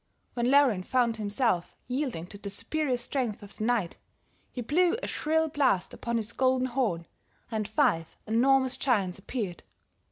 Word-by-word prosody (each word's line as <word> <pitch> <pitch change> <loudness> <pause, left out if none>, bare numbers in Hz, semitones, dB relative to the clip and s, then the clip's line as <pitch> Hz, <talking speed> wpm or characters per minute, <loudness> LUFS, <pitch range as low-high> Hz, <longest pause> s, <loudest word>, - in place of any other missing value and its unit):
When 240 0 0
Laurin 270 -8 +5
found 235 +2 +1
himself 205 -3 0
yielding 250 - -2
to 200 +3 -10
the 200 - -5
superior 250 +6 -1
strength 240 -4 -3
of 205 - -12
the - - -3
knight, 225 -8 0 0.5
he 250 - -5
blew 350 - +2
a - - 0
shrill 320 +1 +1
blast 275 - +1
upon 235 0 -2
his 225 0 -4
golden 260 -1 +2
horn, 235 -10 -1 0.5
and 215 -2 -1
five 205 - +1
enormous 260 +3 +3
giants 200 -9 +1
appeared. 195 -4 -4
240 Hz, 155 wpm, -28 LUFS, 205-265 Hz, 0.5 s, Laurin